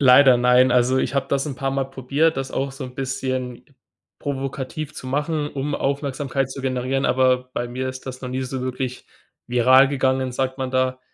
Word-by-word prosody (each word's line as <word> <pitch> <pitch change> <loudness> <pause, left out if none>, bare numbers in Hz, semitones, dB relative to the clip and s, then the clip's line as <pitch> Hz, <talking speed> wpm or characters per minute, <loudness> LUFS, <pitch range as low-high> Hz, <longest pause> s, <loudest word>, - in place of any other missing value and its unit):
Leider 130 -1 +7
nein. 125 +1 +5
Also, 125 +1 +3
ich 140 - -1
habe 140 - 0
das 140 +2 0
'n 135 -3 -5
paarmal 135 0 -2
probiert, 140 +5 +1
das 135 0 -3
auch 135 +1 -2
so 135 0 -7
'n 125 - -9
bisschen 130 -2 -3 0.6
provokativ 140 +2 -4
zu 130 - -8
machen, 150 +2 -1
um 140 +1 -3
Aufmerksamkeit 140 -1 -1
zu 135 0 -7
generieren. 130 +1 -1
Aber 130 0 +2
bei 120 - -3
mir 130 +2 -3
ist 130 +1 -8
das 130 -1 -6
noch 125 - -5
nie 130 +1 -2
so 130 0 -4
wirklich 130 0 -4 0.4
viral 130 +3 +6
gegangen, 130 -2 0
sagt 130 +1 -2
man 130 -1 -2
da, 130 0 0
130 Hz, 190 wpm, -22 LUFS, 130-135 Hz, 0.6 s, Leider